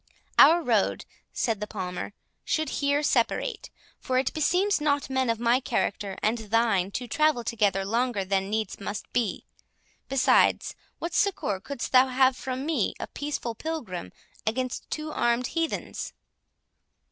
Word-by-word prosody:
"Our 340 +2 +8
road," 225 -7 +1 0.3
said 225 -4 -1
the 210 - -3
Palmer, 185 -1 -5 0.3
"should 315 -2 0
here 285 +1 +2
separate; 240 -5 0 0.3
for 255 - -1
it 260 0 +1
beseems 360 +4 +2
not 285 -2 0
men 260 -2 +1
of 230 -1 0
my 240 +2 +3
character 200 -6 -2
and 225 +2 +2
thine 220 -3 +1
to 250 - -3
travel 305 0 +2
together 205 -4 +1
longer 230 -1 0
than 195 0 0
needs 220 +1 -2
must 200 +1 -5
be. 230 -6 -1 0.6
Besides, 270 -1 +3 0.2
what 335 0 -5
succour 355 - +1
couldst 265 +4 -5
thou 255 0 +6
have 260 0 +3
from 260 +1 -4
me, 320 0 0
a - - -3
peaceful 285 -5 -4
Pilgrim, 225 - -5 0.3
against 255 +3 -2
two 310 0 -4
armed 240 -2 +1
heathens?" 330 -1 -3
245 Hz, 145 wpm, -27 LUFS, 210-285 Hz, 0.6 s, Our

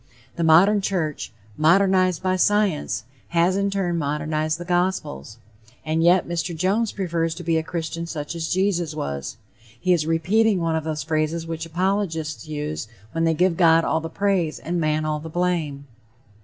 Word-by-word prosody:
The 170 - -1
modern 185 +6 +5
church, 170 - -2 0.3
modernized 185 +2 +3
by 185 0 +1
science, 200 -7 +1 0.2
has 175 +2 +2
in 200 0 +1
turn 185 -4 -1
modernized 155 +1 -1
the 175 - -7
gospels. 175 - -1 0.5
And 160 +1 0
yet 175 +2 +4
Mr. 170 0 -3
Jones 200 +6 +1
prefers 165 -4 -2
to 175 - -8
be 165 0 +1
a - - +1
Christian 165 0 -4
such 150 -1 -5
as 165 -1 -3
Jesus 175 -4 0
was. 70 - -4 0.4
He 185 0 +2
is 160 -3 0
repeating 195 +6 +2
one 165 -1 0
of 160 -1 -2
those 155 -1 -3
phrases 160 +1 -1
which 165 0 -5
apologists 165 -3 -2
use 150 -4 -4 0.2
when 165 0 0
they 165 -1 +2
give 180 +1 +2
God 165 -2 +5
all 160 - +1
the 165 +1 -6
praise 190 -4 0
and 175 +1 -3
man 155 0 0
all 155 -1 -1
the 160 +2 -8
blame. 160 -5 -1
165 Hz, 170 wpm, -23 LUFS, 155-185 Hz, 0.5 s, modern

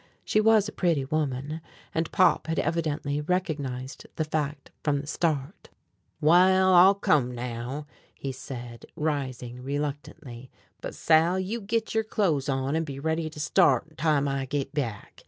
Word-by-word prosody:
She 215 - +2
was 215 -1 +4
a - - -5
pretty 165 -7 0
woman, 150 +1 -2 0.3
and 165 0 -1
Pop - - +3
had 165 - -1
evidently 150 -3 -1
recognized 145 -7 -3
the 155 - -1
fact 150 -2 -3
from 145 -2 +1
the 145 - -6
start. 155 +1 -2 0.5
"Wal, 185 +4 +5
I'll 185 +3 +8
come 135 -10 +1
now," 125 +4 -5 0.3
he 135 - -4
said, 120 -3 -8
rising 130 -5 -3
reluctantly; 140 -2 -5 0.3
"but, - - -6
Sal, 165 +3 +3
you 210 +5 -3
git 225 +2 -2
yer 220 - +3
clothes 175 -10 0
on 135 +2 0
an' 165 - +1
be 140 -3 -6
ready 160 +2 -1
to 150 - -11
start 150 0 +2
time 150 -3 +1
I 135 -1 -1
git 140 +1 -3
back. 120 -8 -4
150 Hz, 155 wpm, -27 LUFS, 135-165 Hz, 0.5 s, I'll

